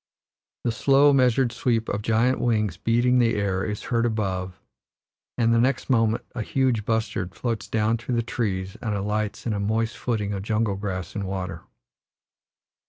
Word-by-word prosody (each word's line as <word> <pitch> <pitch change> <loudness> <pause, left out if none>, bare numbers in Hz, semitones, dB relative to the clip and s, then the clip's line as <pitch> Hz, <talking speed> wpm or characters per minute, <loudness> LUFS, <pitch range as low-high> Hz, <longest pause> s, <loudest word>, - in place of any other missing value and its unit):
The 120 - +1
slow, 140 +5 +4
measured 125 -2 +3
sweep 115 -2 0
of 100 - -2
giant 115 +4 +2
wings 110 -7 +1
beating 120 +6 +2
the 115 -2 +3
air 100 -2 0
is 105 -1 -4
heard 115 -1 +1
above, 95 -5 -2 0.8
and 115 -1 +3
the 115 - +4
next 135 +2 0
moment 115 -2 +2
a 120 - -3
huge 125 -2 0
bustard 110 -5 -1
floats 115 -4 -3
down 110 +2 +1
through 120 +1 -3
the 115 - +1
trees 95 -5 -2
and 110 -3 -2
alights 105 +1 -2
in 115 - 0
a 100 - -2
moist 110 +3 0
footing 105 -4 -2
of 100 - -3
jungle 105 0 0
grass 95 -3 -4
and 100 -3 -3
water. 95 -3 -4
110 Hz, 170 wpm, -25 LUFS, 100-120 Hz, 0.8 s, slow